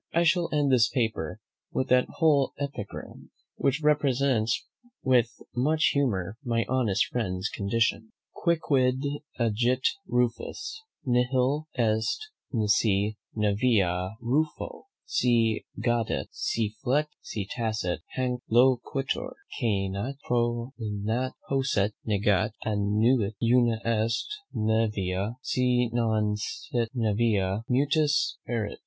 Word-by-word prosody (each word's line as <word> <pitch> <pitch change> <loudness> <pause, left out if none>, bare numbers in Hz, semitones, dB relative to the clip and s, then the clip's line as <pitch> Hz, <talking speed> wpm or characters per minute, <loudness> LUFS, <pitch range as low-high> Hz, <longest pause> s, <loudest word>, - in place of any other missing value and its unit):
I 170 - +4
shall 170 0 +3
end 145 -2 +2
this 120 -2 +5
paper 110 - -1 0.3
with 130 - -1
that 125 0 +4
whole 150 -5 +3
epigram, 140 -8 -6 0.3
which 140 +3 0
represents 135 -6 +2 0.4
with 125 -3 +4 0.3
much 155 +6 +3
humour 110 -8 0
my 115 -3 0
honest 115 -6 +2
friend's 95 -4 -1
condition. 110 +1 0 0.2
QUICQUID 135 -6 +1 0.3
AGIT 120 +2 +2 0.2
RUFUS, 125 - -1 0.2
NIHIL 130 +4 +2
EST, 110 - +1 0.3
NISI 105 -2 +2 0.2
NAEVIA 100 -3 +1
RUFO, 150 - -1 0.2
SI 115 -3 +2
GAUDET, 120 -2 0
SI 110 -2 -1
FLET, 145 +5 +2
SI 100 -3 -4
TACET, 110 -7 -1 0.2
HANC 125 -1 -1
LOQUITUR: 135 - +2 0.2
CAENAT, 100 +1 -1
PROPINAT, 120 -1 -1
POSCET, 130 -7 +1
NEGAT, 105 0 +2
ANNUIT, 105 +1 +2
UNA 120 -1 +3
EST 115 0 +1 0.3
NAEVIA; 105 -2 0
SI 125 -2 +1
NON 110 -3 +1
SIT 115 +2 -3
NAEVIA, 105 -3 +1
MUTUS 145 +3 +2
ERIT. 115 -4 -2
120 Hz, 100 wpm, -27 LUFS, 110-130 Hz, 0.4 s, this